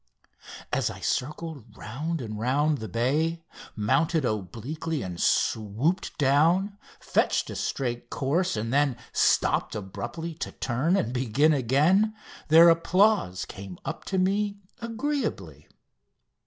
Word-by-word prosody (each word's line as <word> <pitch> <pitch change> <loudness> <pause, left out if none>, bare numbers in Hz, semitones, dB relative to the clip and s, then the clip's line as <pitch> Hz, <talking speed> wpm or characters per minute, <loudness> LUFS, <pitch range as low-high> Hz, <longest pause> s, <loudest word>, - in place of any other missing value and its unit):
As - - +1
I - - -8
circled 140 -5 -4
round 150 +8 -4
and 110 -3 -6
round 145 +5 +1
the 110 - -5
bay, 155 - 0 0.3
mounted 155 +8 +1
obliquely 120 - -3
and 90 -2 -6
swooped 115 - 0
down, 165 +8 +3 0.2
fetched - - 0
a - - -6
straight 120 -2 -3
course, 145 +1 0
and 115 +3 -2
then 140 -3 +2 0.2
stopped - - +2
abruptly 120 - -5
to 160 - -6
turn 135 +10 0
and 120 - -1
begin 130 +5 +2
again, 150 - +3 0.3
their 165 +2 +8
applause 170 - +2
came 95 -3 -9
up 165 - -5
to 190 - -2
me 200 +2 +1 0.2
agreeably. 230 - -3
145 Hz, 120 wpm, -26 LUFS, 115-170 Hz, 0.3 s, their